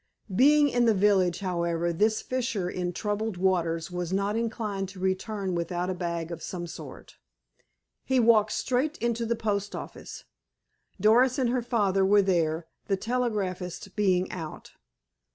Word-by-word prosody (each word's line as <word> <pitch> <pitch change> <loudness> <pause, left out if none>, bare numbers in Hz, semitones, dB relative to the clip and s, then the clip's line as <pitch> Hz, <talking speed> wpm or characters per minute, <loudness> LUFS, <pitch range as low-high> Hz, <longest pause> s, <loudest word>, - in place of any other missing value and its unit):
Being 295 +5 +6
in 245 -3 +2
the 225 -2 +4
village, 190 -3 +3
however, 170 -2 -1
this 215 +5 +1
fisher 240 -7 -2
in 180 0 -2
troubled 210 +2 -2
waters 175 -2 0
was 180 -1 -3
not 200 +2 0
inclined 215 -4 -2
to 190 -1 -11
return 190 +1 -2
without 175 +1 -2
a - - -1
bag 170 -2 -3
of 165 -1 -6
some 175 -2 -5
sort. 165 - -10 0.9
He 265 -1 +2
walked 220 -3 +4
straight 265 +5 0
into 235 0 -1
the 235 - +1
post 205 -2 -2
office. - - -8 0.8
Doris 245 +5 +4
and 250 -3 +1
her 250 0 +1
father 205 -5 +1
were 200 +1 +5
there, 165 -3 +1 0.2
the 195 - +1
telegraphist 195 -6 -3
being 185 -3 +2
out. 165 -4 -7
195 Hz, 150 wpm, -27 LUFS, 180-225 Hz, 0.9 s, Being